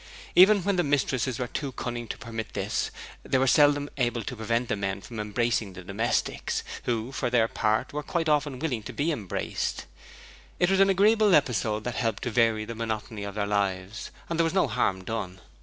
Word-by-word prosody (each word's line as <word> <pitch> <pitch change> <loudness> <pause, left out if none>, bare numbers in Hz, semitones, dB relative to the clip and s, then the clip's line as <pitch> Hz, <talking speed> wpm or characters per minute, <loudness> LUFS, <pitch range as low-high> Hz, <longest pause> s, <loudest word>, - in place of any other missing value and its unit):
Even 195 +1 +7
when 200 0 +1
the 175 - +3
mistresses 135 -4 0
were 125 - -1
too 135 +3 -4
cunning 120 -1 -4
to - - -5
permit 115 -1 -5
of - - -23
this, - - -1 0.3
they 130 - 0
were 130 - +3
seldom 145 +2 +4
able 120 -3 0
to 125 - -5
prevent 115 +2 -1
the - - 0
men 95 -1 -2
from 110 +2 -8
embracing 105 -1 0
the 90 0 -9
domestics, 100 +6 -1 0.2
who 115 +1 -1
for 130 - -1
their 120 -2 +3
part 110 +5 0
were 150 - -2
quite 165 +2 -2
often 145 -3 +1
willing 130 -5 -2
to 105 - -8
be 155 +4 0
embraced; 105 - -3 0.7
it 175 +1 +2
was 195 - +3
an 195 0 +6
agreeable 205 0 +5
episode 110 -6 +1
that 120 - -4
helped 115 -4 -1
to 120 - -2
vary 115 -2 +2
the 115 - -6
monotony 110 -2 -4
of 100 0 -6
their 105 -1 0
lives, 100 0 -2 0.2
and 170 0 -3
there - - +5
was 165 +3 -1
no 190 - +4
harm 100 -5 0
done. 95 -3 -4
120 Hz, 205 wpm, -27 LUFS, 110-145 Hz, 0.7 s, Even